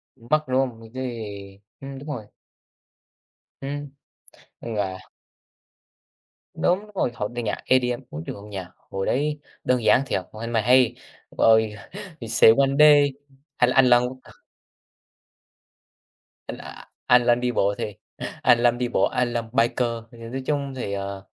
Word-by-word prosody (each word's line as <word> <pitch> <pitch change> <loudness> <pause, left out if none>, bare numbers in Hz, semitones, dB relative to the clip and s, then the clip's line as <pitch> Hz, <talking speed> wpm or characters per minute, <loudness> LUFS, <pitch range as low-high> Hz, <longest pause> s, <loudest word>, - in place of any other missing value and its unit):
Mất, 150 +5 0
đúng 130 0 +1
hông? 125 -4 -2
Đ - - -13
đấy, 105 -6 -6 0.2
ưm, 135 0 -7
đúng 145 - -11
rồi. 120 -8 -5 1.3
Ừm, 145 +1 -5 0.7
là 100 -5 -3 1.5
Đúng 185 +4 +1
rồi, 125 - 0
hoặc 105 +1 -3
là 120 - -2
nhạc 110 -3 -1
EDM, 125 -1 +2
ối 75 +2 -7
trời - - -5
ơi, 100 - -11
nhạc 95 -3 -7 0.2
hồi 95 0 -2
đấy, 150 +3 0 0.2
đơn 125 -2 +1
giản 110 +4 +5
thiệt, 95 - -1
ôi 110 +1 -9
hay 115 - -5
mà 115 - +3
hay, 125 +1 +4 0.4
rồi, 110 -1 +4 0.5
"He 115 - -6
Said 110 +1 +6
One 135 -1 +4
Day" 145 -2 +7 0.4
hay 125 - +4
là - - -1
Alan 125 -2 +6
Walker. 130 +1 -8 2.1
A - - -9 0.2
Alan 120 0 +4
đi 125 0 0
bộ 100 -3 +1
thì, 105 - -4 0.5
Alan 120 0 +4
đi 125 0 -1
bộ, 110 -5 0
Alan 120 -2 -1
biker. 120 0 +2 0.2
Thì, 120 - -15
à, 115 - -7
nói 135 +2 -4
chung 140 -2 -1
thì, 100 -6 -4
ờ, 100 0 -5
120 Hz, 150 wpm, -24 LUFS, 110-130 Hz, 2.1 s, Day